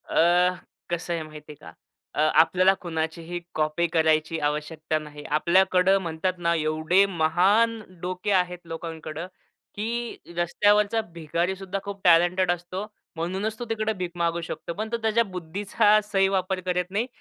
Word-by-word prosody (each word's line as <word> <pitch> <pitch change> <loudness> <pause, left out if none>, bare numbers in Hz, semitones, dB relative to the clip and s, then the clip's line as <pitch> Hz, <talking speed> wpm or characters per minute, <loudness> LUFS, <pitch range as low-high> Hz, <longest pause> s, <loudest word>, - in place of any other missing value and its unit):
अ, 180 +2 +4 0.3
कसं 175 0 -2
आहे 165 -1 -2
माहिती 150 -1 -11
आहे - - -17
का? - - -9 0.4
अ, - - -4 0.2
आपल्याला 185 +4 +4
कुणाचीही 165 0 -3 0.2
कॉपी 155 +2 +1
करायची 160 -1 +1
आवश्यकता 155 +1 -2
नाही. 150 -1 -10
आपल्याकडं 185 +5 +3
म्हणतात 170 +1 -2
ना, 170 -1 +1
एवढे 155 +4 +2
महान 195 +6 +2 0.2
डोके 185 +3 -3
आहेत 180 -2 +2
लोकांकडं, 165 0 -6 0.5
की 235 +3 -3 0.2
रस्त्यावरचा 205 +5 +3
भिकारी 170 +3 -1
सुद्धा 195 +1 -5
खूप 200 -1 -7
टॅलेंटेड 175 +1 +4
असतो. 175 +3 -4 0.3
म्हणूनच 190 +6 -3
तो 240 - -4
तिकडे 220 -1 0
भिक 180 -3 -4
मागू 170 0 0
शकतो. 170 0 -6
पण 215 +4 -4
तो 235 - 0
त्याच्या 225 +1 +3
बुद्धीचा 200 +3 +1
सही 195 -2 +2
वापर 190 -1 -1
करत 180 0 -1
नाही. 215 +5 0
180 Hz, 145 wpm, -25 LUFS, 165-195 Hz, 0.5 s, अ